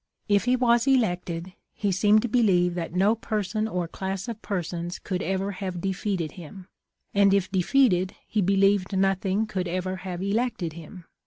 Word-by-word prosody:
If 205 0 +2
he 250 0 +3
was 240 0 +3
elected, 180 -8 0 0.2
he 205 -2 0
seemed 210 +3 +4
to - - 0
believe 190 -7 +3
that 170 -1 -5
no 195 +4 +4
person 215 -1 -2
or 180 -5 -2
class 190 +4 -4
of 230 -2 -6
persons 175 -2 -3
could 185 -2 -4
ever 190 +2 -1
have 185 -2 -5
defeated 190 -3 -2
him, 180 +3 -11 0.5
and 200 -1 +5
if 195 -1 0
defeated, 190 -1 +2
he 215 - 0
believed 195 0 +2
nothing 195 +2 +1
could 190 -4 -3
ever 185 +2 -2
have 185 -1 -5
elected 205 -5 -1
him. 170 +2 -11
195 Hz, 165 wpm, -26 LUFS, 180-210 Hz, 0.5 s, and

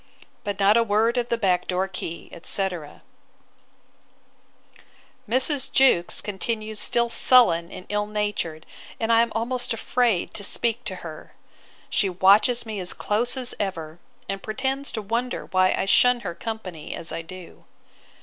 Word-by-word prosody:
But 205 -1 -4
not 200 +3 +5
a - - +5
word 225 +3 +2
of 240 0 -3
the 235 - +1
back 185 -5 +1
door 185 +1 0
key, 175 -3 -7
etc.' 175 -3 -3 2.3
Mrs. 260 +3 +1
Jewkes 260 -10 +3
continues 215 +1 -3
still 235 +2 +3
sullen 230 -9 +4
and 185 - -9
ill 210 0 -1
natured, 205 -7 -3 0.3
and 230 0 +1
I 230 - +6
am 235 -1 0
almost 245 +2 -2
afraid 230 -4 0
to 205 - -3
speak 235 +3 +1
to 190 -5 -2
her. 155 -2 -10 0.6
She 200 -4 +2
watches 200 +7 +4
me 215 -2 -5
as 180 -1 -5
close 235 +5 -1
as 255 -1 -2
ever, 165 -5 -4 0.3
and 195 0 -4
pretends 265 +6 -3
to 220 - -4
wonder 235 +4 -2
why 185 0 +2
I - - -1
shun 245 +5 +4
her 170 - -4
company 185 -6 -6
as 165 - -4
I - - -4
do. 180 +1 -12
210 Hz, 150 wpm, -24 LUFS, 185-235 Hz, 2.3 s, I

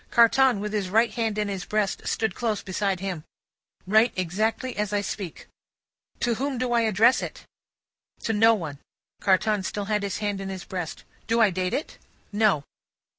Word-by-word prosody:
Carton, 240 0 +5
with 210 +1 -4
his 200 -3 -1
right 225 +4 +3
hand 225 -3 -1
in 210 -1 0
his 195 -2 -3
breast, 210 -2 -1
stood 220 -4 0
close 220 -1 -2
beside 190 0 -1
him. 185 -5 -4 0.6
"Write 220 +5 +4
exactly 215 +8 -1
as 210 -1 -1
I 205 -1 +1
speak." 195 -3 -6 0.8
"To 240 - +2
whom 270 +3 -2
do 250 0 -1
I 235 - +4
address 225 +3 +4
it?" - - -7 0.8
"To 225 - 0
no 225 +2 +5
one." 155 -8 -6 0.4
Carton 205 +2 +2
still 200 +2 -3
had 210 0 0
his 200 -1 -2
hand 205 -2 -2
in 195 - -5
his 190 -2 -6
breast. 180 -4 -5 0.2
"Do 230 +1 +2
I 220 -4 +5
date 185 0 -1
it?" 300 - -5 0.3
"No." 205 -8 +2
210 Hz, 180 wpm, -25 LUFS, 190-225 Hz, 0.8 s, Carton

